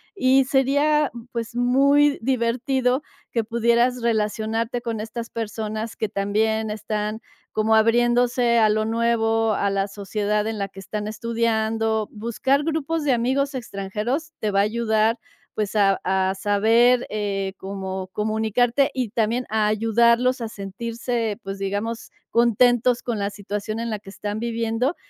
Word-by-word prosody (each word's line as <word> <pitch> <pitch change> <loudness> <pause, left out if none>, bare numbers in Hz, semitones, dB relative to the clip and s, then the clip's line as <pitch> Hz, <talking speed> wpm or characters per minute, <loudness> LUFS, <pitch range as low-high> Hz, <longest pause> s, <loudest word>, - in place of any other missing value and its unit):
y 265 -5 +4
sería 285 +3 +2 0.2
pues 235 -1 -5
muy 280 +4 +3
divertido 250 +2 0 0.3
que 230 - 0
pudieras 235 +2 +2
relacionarte 225 +1 0
con 230 -3 -3
estas 230 +2 -6
personas 220 0 -4
que 220 - -2
también 215 +2 0
están 210 +1 -3 0.3
como 215 +1 +1
abriéndose 240 +1 +3
a 215 -1 +5
lo 215 +1 +1
nuevo 225 -1 +1
a 200 0 0
la 195 0 0
sociedad 210 +1 -2
en 220 -1 -3
la 200 - -1
que 195 0 -13
están 210 +1 -5
estudiando, 225 -1 0
buscar 235 +6 0
grupos 320 0 -1
de 280 -3 +2
amigos 265 +4 0
extranjeros 240 +7 -3
te 215 - -1
va 195 - +2
a - - +6
ayudar, 220 +1 +1 0.4
pues 210 -1 -2
a 195 -2 +3
a 190 0 +1
saber, 225 +5 +3
eh, 195 -2 -2
cómo 190 -1 -5
comunicarte 220 +5 +1
y 250 -4 -2
también 230 +3 0
a 215 -1 +1
ayudarlos 235 +4 +3
a 230 - -2
sentirse, 225 +2 -4
pues 195 -1 -6
digamos 205 +4 -3 0.2
contentos 240 +1 +3
con 235 -3 -3
la 200 0 -2
situación 205 +2 -4
en 230 0 -3
la 215 - -2
que 200 -1 -14
están 205 +2 -4
viviendo, 230 +5 -1
225 Hz, 145 wpm, -23 LUFS, 210-240 Hz, 0.4 s, a